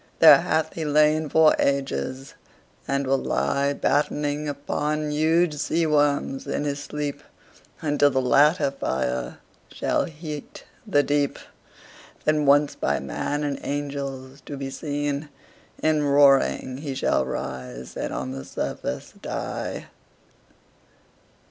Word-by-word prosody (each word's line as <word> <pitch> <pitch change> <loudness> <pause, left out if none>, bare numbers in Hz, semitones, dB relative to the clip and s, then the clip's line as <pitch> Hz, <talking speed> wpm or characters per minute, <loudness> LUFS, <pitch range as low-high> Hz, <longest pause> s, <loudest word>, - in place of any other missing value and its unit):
There - - +9
hath 160 0 0
he 165 - -4
lain 150 +1 +3
for 160 +1 +5
ages, 135 - -1 0.5
and 140 0 0
will 135 0 +2
lie 140 0 0
Battening 145 +1 0
upon 150 +1 -2
huge 160 +2 +2
sea 165 +3 0
worms 145 -3 +1
in - - -1
his 145 -1 -2
sleep, 145 -1 -4 0.6
Until 145 -2 +3
the 130 - 0
latter 145 +3 +4
fire 65 - -2 0.3
shall - - 0
heat 150 -2 -8 0.2
the 145 -8 +3
deep; 145 -1 0 0.9
Then 150 -1 +2
once 145 +1 +5
by - - -1
man 145 - -3
and 145 -1 -2
angels 140 -1 -5
to 145 - -5
be 135 0 -5
seen, 145 +1 -3 0.5
In 155 -1 +3
roaring 140 -2 +3
he 140 -2 -5
shall 100 - +1
rise 65 -1 -6
and - - -3
on 65 0 -4
the 65 0 -6
surface - - -5
die. - - -4
145 Hz, 125 wpm, -24 LUFS, 135-150 Hz, 0.9 s, There